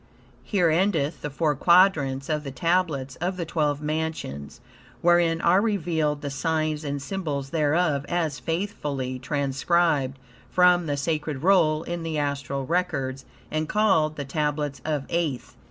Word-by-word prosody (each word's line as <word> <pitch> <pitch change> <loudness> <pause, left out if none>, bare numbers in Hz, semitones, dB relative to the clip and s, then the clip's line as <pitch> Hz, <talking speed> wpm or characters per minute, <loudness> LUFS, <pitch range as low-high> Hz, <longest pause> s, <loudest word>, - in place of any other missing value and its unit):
Here 180 -6 +2
endeth 165 -3 +1
the 150 - -3
four 150 +2 0
Quadrants 145 -5 +3
of 150 -1 -1
the 140 - -5
Tablets 160 -4 0
of 180 +2 -2
the 170 - -3
Twelve 150 -3 -1
Mansions, 155 - -4 0.4
wherein 170 -1 +3
are 180 +3 +4
revealed 160 -8 0
the 140 - -3
signs 155 +1 -1
and 145 -1 -3
symbols 140 -4 -4
thereof, 155 -2 +1
as 160 -5 -1
faithfully 145 -8 -3
transcribed 140 +1 +1 0.3
from 180 -2 +4
the 145 -1 -1
sacred 150 -1 -2
roll 165 -5 +4
in 175 0 -4
the 165 -1 -3
astral 140 -2 -2
records 135 -5 -1 0.3
and 155 0 -2
called 190 -8 +2
"The 145 - -5
Tablets 145 -1 -2
of 150 -3 -2
Aeth." 160 -7 -2
155 Hz, 140 wpm, -25 LUFS, 140-170 Hz, 0.4 s, are